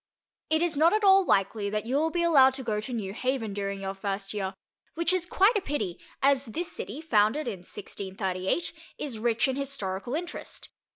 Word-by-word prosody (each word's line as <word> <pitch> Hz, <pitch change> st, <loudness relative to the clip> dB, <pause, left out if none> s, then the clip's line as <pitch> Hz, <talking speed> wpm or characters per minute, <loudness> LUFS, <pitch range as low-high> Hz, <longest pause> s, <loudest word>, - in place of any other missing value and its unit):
It 315 Hz, +1 st, +3 dB
is 340 Hz, -4 st, 0 dB
not 325 Hz, +5 st, +5 dB
at 430 Hz, 0 st, +1 dB
all 390 Hz, -1 st, +7 dB
likely 200 Hz, -, +1 dB
that 210 Hz, +1 st, -2 dB
you 250 Hz, +3 st, -1 dB
will 315 Hz, +3 st, +2 dB
be 340 Hz, +1 st, 0 dB
allowed 270 Hz, -6 st, +6 dB
to 265 Hz, -, -5 dB
go 215 Hz, -3 st, -1 dB
to 235 Hz, -, -6 dB
New 205 Hz, -5 st, -3 dB
Haven 250 Hz, -3 st, -1 dB
during 200 Hz, -1 st, -3 dB
your 195 Hz, 0 st, -3 dB
first 195 Hz, 0 st, -4 dB
year, 195 Hz, -2 st, -3 dB, 0.4 s
which 335 Hz, +2 st, +2 dB
is 360 Hz, -1 st, +1 dB
quite 400 Hz, +6 st, +4 dB
a 415 Hz, -, +2 dB
pity, 215 Hz, -, -3 dB, 0.2 s
as 275 Hz, 0 st, +4 dB
this 330 Hz, +10 st, -4 dB
city, 255 Hz, +10 st, -6 dB
founded 230 Hz, -1 st, +2 dB
in 205 Hz, -6 st, -3 dB
1638, 190 Hz, -, -3 dB, 0.2 s
is 250 Hz, -7 st, -4 dB
rich 230 Hz, +1 st, +2 dB
in 265 Hz, 0 st, -1 dB
historical 245 Hz, -5 st, -3 dB
interest. 345 Hz, +2 st, -6 dB
240 Hz, 195 wpm, -28 LUFS, 200-315 Hz, 0.4 s, all